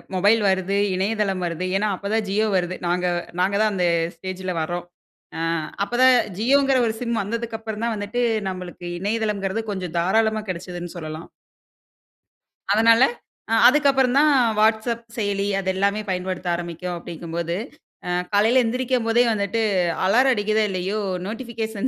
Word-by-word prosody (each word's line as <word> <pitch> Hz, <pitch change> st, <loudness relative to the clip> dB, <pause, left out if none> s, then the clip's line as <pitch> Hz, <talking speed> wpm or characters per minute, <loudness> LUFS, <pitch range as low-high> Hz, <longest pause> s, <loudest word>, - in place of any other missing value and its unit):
Mobile 205 Hz, +4 st, +4 dB
வருது. 190 Hz, +1 st, 0 dB, 0.2 s
இணையதளம் 195 Hz, -1 st, -1 dB
வருது. 170 Hz, +1 st, -3 dB
ஏன்னா, 210 Hz, +1 st, 0 dB
அப்ப 200 Hz, +2 st, -6 dB
தான் 220 Hz, -1 st, +1 dB
ஜியோ 215 Hz, +3 st, +1 dB
வருது. 180 Hz, 0 st, 0 dB
நாங்க 180 Hz, +1 st, 0 dB, 0.3 s
நாங்க 195 Hz, +2 st, +2 dB
தான் 215 Hz, -1 st, +3 dB
அந்த 180 Hz, -2 st, 0 dB, 0.3 s
ஸ்டேஜ்ல 185 Hz, +1 st, -5 dB
வர்றோம். 175 Hz, +2 st, -3 dB, 0.5 s
அ -, -, -4 dB, 0.4 s
அப்ப 205 Hz, -, -6 dB
தான் 260 Hz, -1 st, +7 dB, 0.2 s
ஜியோங்கிற 270 Hz, +3 st, +3 dB
ஒரு 220 Hz, -, -1 dB
சிம் 235 Hz, -3 st, -1 dB
வந்ததுக்கு 230 Hz, +2 st, -4 dB
அப்புறந்தான் 225 Hz, +1 st, -3 dB
வந்துட்டு, 210 Hz, +4 st, -2 dB, 0.3 s
நம்மளுக்கு 180 Hz, -1 st, -7 dB
இணையதளம்ங்கிறது 210 Hz, 0 st, -1 dB
கொஞ்சம் 180 Hz, -4 st, -5 dB
தாராளமா 220 Hz, +4 st, +2 dB
கிடச்சதுன்னு 175 Hz, 0 st, -6 dB
சொல்லலாம். 155 Hz, 0 st, -7 dB, 1.4 s
அதனால, 230 Hz, +2 st, +5 dB, 0.5 s
அ -, -, +2 dB
அதுக்கு 285 Hz, +2 st, +4 dB
அப்புறந்தான் 270 Hz, +3 st, +3 dB, 0.3 s
வாட்ஸ்அப் 225 Hz, +2 st, +1 dB
செயலி 200 Hz, -2 st, -1 dB
அது 190 Hz, -1 st, -2 dB
எல்லாமே 200 Hz, +2 st, +1 dB
பயன்படுத்த 185 Hz, 0 st, -3 dB
ஆரம்பிக்கும், 175 Hz, +1 st, -5 dB
அப்பிடிங்கம்போது 170 Hz, 0 st, -5 dB, 0.5 s
அ -, -, -3 dB, 0.2 s
காலையில 225 Hz, +5 st, +4 dB
எந்திரிக்கும் 250 Hz, 0 st, -1 dB
போதே 230 Hz, +1 st, +4 dB
வந்துட்டு 205 Hz, +2 st, -1 dB, 0.4 s
அலாரம் 255 Hz, +7 st, +4 dB
அடிக்கிதோ! 215 Hz, 0 st, +1 dB
இல்லயோ! 190 Hz, +3 st, -2 dB, 0.3 s
நோட்டிபிகேஷன் 225 Hz, 0 st, -4 dB
205 Hz, 135 wpm, -22 LUFS, 185-225 Hz, 1.4 s, தான்